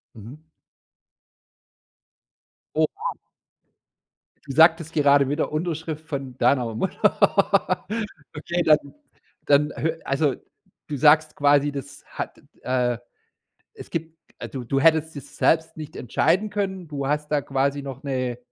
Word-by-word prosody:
Mhm. 135 +9 -12 2.3
Oh, - - +2
wow. - - -4 1.3
Du 140 - -6
sagtest 160 +1 +5
gerade 140 -2 +4
wieder 150 +1 -1
Unterschrift 160 -1 -3
von 135 -4 -5
deiner 120 -2 +2
Mutter. 115 - +1 0.5
Okay, 170 +3 -2
dann 155 -1 +6 0.7
dann 145 +1 +3
hö 160 +1 -2
also, 140 0 +1 0.5
du 150 - -4
sagst 155 +3 +4
quasi, 145 0 +3
das 140 -2 -8
hat, - - -6 0.2
äh 125 -2 0 0.8
es - - -11
gibt 165 0 -4 0.2
also, 130 - -6
du - - -7
du 135 +3 0
hättest 160 0 +3
das 140 - -10
selbst 160 0 +2
nicht 155 -1 -8
entscheiden 170 - +1
können, 190 -4 -3
du 140 -2 -4
hast 150 +1 -1
da 150 -1 +2
quasi 140 +1 -1
noch 135 +1 -8
'ne 130 -3 -2
145 Hz, 125 wpm, -24 LUFS, 135-160 Hz, 2.3 s, dann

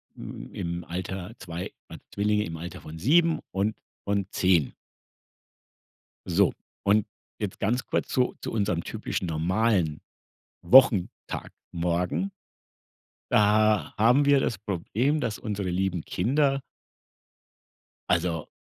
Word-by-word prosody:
hm, - - -9
im 85 0 -4
Alter- 95 +3 -5
2, 85 -1 -6 0.2
waren - - -11
Zwillinge- 105 +1 +1
im 80 -1 -6
Alter 85 +2 -7
von 80 +1 -9
7 165 - +4
und 100 +3 0 0.3
von 100 -1 0
10. 90 -7 +2 1.5
So - - +3 0.3
und 105 +1 +3 0.3
jetzt 105 -3 -4
ganz 120 +6 0
kurz - - -1
zu 125 -1 +1
zu - - -4
unserem 100 -6 0
typischen 90 - -3
normalen 85 0 +1 0.6
Wochentagmorgen. 90 - +2 1.0
Da 105 0 +3
haben 125 +6 +5
wir 140 -1 +5
das 115 - -1
Problem, 110 - -1
dass 115 -4 -2
unsere 100 -5 -3
lieben 90 -2 -1
Kinder 135 +7 +1 1.5
also 80 -3 +1
100 Hz, 110 wpm, -27 LUFS, 90-115 Hz, 1.5 s, haben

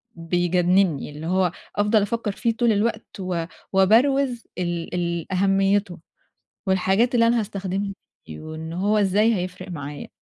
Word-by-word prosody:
بيجنني، 175 0 +1
اللي 150 +2 -7
هو 185 0 +2 0.2
أفضل 210 +1 +3
أفكر 210 +1 -1
فيه 230 +2 -1
طول 235 0 +2
الوقت، 215 0 -1
و 180 -3 -2 0.3
وابروز 240 +6 +3
ال 175 -2 -3
ال 170 0 -2
أهميته، 195 -1 +1 0.7
والحاجات 190 +6 +2
اللي 230 -1 +5
أنا 235 0 +3
هاستخدمها 195 -1 -3 0.3
بيه، 80 -1 -9
وإن 155 +1 -7
هو 200 +5 +1
إزاي 210 +3 +3
هيفرق 180 -1 -5
معايا. 145 -3 -7
190 Hz, 135 wpm, -23 LUFS, 175-215 Hz, 0.7 s, اللي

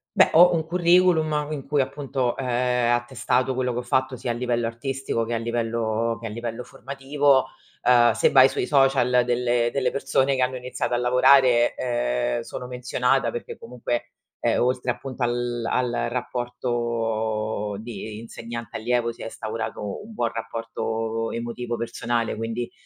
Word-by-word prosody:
Beh, - - +6
ho 175 +2 +7
un 165 -2 +1
curriculum 170 -3 +3
in 145 -3 -5
cui, 145 0 +2
appunto, 135 -2 -2
è 135 - -3 0.4
attestato 120 +2 0
quello 125 -1 0
che 120 - -2
ho - - -2
fatto, 130 +2 0
sia 125 - -5
a 120 - 0
livello 120 -1 -1
artistico 125 0 -3
che 120 - -3
a - - +1
livello 115 -1 -1
che 115 - -4
a - - -5
livello 115 +2 -5
formativo, 135 +2 +1 0.3
uhm, 120 -1 +5
se - - +3
vai 130 -1 +7
sui - - -2
social 135 -3 +4
delle 120 -1 +1
delle 130 -2 +1
persone 135 +1 +1
che 130 - +2
hanno 130 +1 -1
iniziato 125 0 -3
a - - +2
lavorare, 125 0 +5
ehm, - - -1
sono 125 - -7
menzionata 125 0 0
perché 120 - -6
comunque, 120 0 -4 0.3
ehm, - - +2
oltre 125 0 +1
appunto 130 +1 -5
al 120 0 -1
al 125 0 0 0.2
rapporto 115 -4 -2
di 110 -1 -7
insegnante-allievo 115 +1 -3
si - - -10
è - - -5
instaurato 110 -2 -5
un 225 - -11
buon 120 - 0
rapporto 115 0 -3
emotivo, 120 +1 -4
personale, 115 0 -2
quindi, 115 +2 -4
120 Hz, 155 wpm, -24 LUFS, 115-130 Hz, 0.4 s, ho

